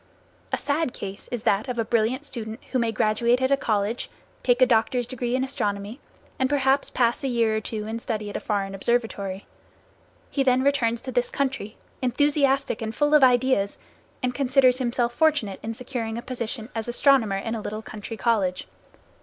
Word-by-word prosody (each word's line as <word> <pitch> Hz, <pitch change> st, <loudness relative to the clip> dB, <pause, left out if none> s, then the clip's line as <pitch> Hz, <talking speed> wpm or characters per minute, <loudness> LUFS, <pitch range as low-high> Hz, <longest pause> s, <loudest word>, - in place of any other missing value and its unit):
A -, -, +1 dB
sad 290 Hz, -2 st, -1 dB
case 195 Hz, 0 st, -7 dB
is 240 Hz, -3 st, -3 dB
that 200 Hz, +2 st, +2 dB
of 250 Hz, -1 st, -3 dB
a 230 Hz, -, 0 dB
brilliant 235 Hz, +5 st, +1 dB
student 225 Hz, -4 st, -6 dB
who 255 Hz, -, +1 dB
may 230 Hz, -1 st, +1 dB
graduate 225 Hz, +3 st, +2 dB
at 260 Hz, +1 st, +1 dB
a -, -, +6 dB
college, 215 Hz, -2 st, -1 dB, 0.3 s
take 245 Hz, -1 st, +2 dB
a 255 Hz, -, +7 dB
doctor's 245 Hz, +1 st, +2 dB
degree 245 Hz, 0 st, -2 dB
in 260 Hz, -, +1 dB
astronomy, 215 Hz, -3 st, -3 dB, 0.4 s
and 260 Hz, 0 st, +2 dB
perhaps 275 Hz, -1 st, +3 dB
pass 240 Hz, +4 st, +1 dB
a -, -, 0 dB
year 230 Hz, -3 st, +2 dB
or 220 Hz, -, -1 dB
two 215 Hz, 0 st, -4 dB
in 225 Hz, +1 st, -4 dB
study 215 Hz, -3 st, -3 dB
at 205 Hz, -, -7 dB
a -, -, -1 dB
foreign 195 Hz, -2 st, -2 dB
observatory. 200 Hz, -2 st, -1 dB, 0.9 s
He 280 Hz, -, 0 dB
then 260 Hz, -1 st, +3 dB
returns 240 Hz, -5 st, +1 dB
to 260 Hz, -, -6 dB
this 245 Hz, 0 st, 0 dB
country, 265 Hz, -6 st, -2 dB, 0.2 s
enthusiastic 275 Hz, 0 st, +2 dB
and 220 Hz, 0 st, -4 dB
full 295 Hz, 0 st, +2 dB
of 300 Hz, -2 st, +7 dB
ideas, 250 Hz, -5 st, +3 dB, 0.5 s
and 250 Hz, 0 st, 0 dB
considers 255 Hz, -1 st, +3 dB
himself 240 Hz, -1 st, 0 dB
fortunate 290 Hz, -, +1 dB
in 225 Hz, +1 st, -4 dB
securing 235 Hz, -3 st, -4 dB
a 235 Hz, -, -5 dB
position 235 Hz, -2 st, -5 dB
as 225 Hz, 0 st, -3 dB
astronomer 240 Hz, -5 st, +3 dB
in 225 Hz, +3 st, -3 dB
a 225 Hz, -, -3 dB
little 215 Hz, +1 st, -5 dB
country 220 Hz, +1 st, -7 dB
college. 205 Hz, -7 st, 0 dB
240 Hz, 185 wpm, -25 LUFS, 220-260 Hz, 0.9 s, a